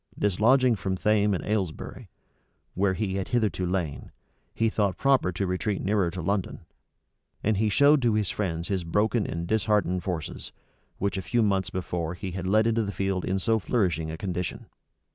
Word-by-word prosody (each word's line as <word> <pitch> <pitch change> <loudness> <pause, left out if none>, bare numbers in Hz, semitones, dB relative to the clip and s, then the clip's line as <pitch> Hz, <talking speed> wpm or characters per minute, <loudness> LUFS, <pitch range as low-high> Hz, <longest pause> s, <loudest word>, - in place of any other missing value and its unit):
Dislodging 115 +5 +3
from 95 0 -2
Thame 105 +1 +2
and - - -4
Aylesbury, 100 -7 -3 0.6
where 95 0 +1
he 95 -2 -2
had 95 - -3
hitherto 110 -6 0
lain, 85 -8 -3 0.4
he 115 - +2
thought 100 -4 0
proper 135 -9 +3
to 100 +3 -1
retreat 95 +2 -1
nearer 100 -2 +1
to 90 0 -6
London; 100 +1 -1 0.8
and 110 -1 +2
he 110 +1 +2
showed 145 +6 +5
to 115 -3 +2
his 105 -3 0
friends 85 -4 -3
his 95 -3 -1
broken 105 +6 +1
and 85 +1 -3
disheartened 105 -3 +1
forces, 85 -6 -4 0.5
which 100 -1 -1
a - - -3
few 120 +5 +1
months 95 -3 +1
before 90 -2 -3
he 95 +1 -5
had 95 +1 -4
led 110 +3 +4
into 115 0 +2
the 100 -2 -2
field 95 -2 -1
in 95 - 0
so 110 +4 +1
flourishing 90 - 0
a 80 - -5
condition. 90 -1 -4
95 Hz, 180 wpm, -27 LUFS, 90-110 Hz, 0.8 s, showed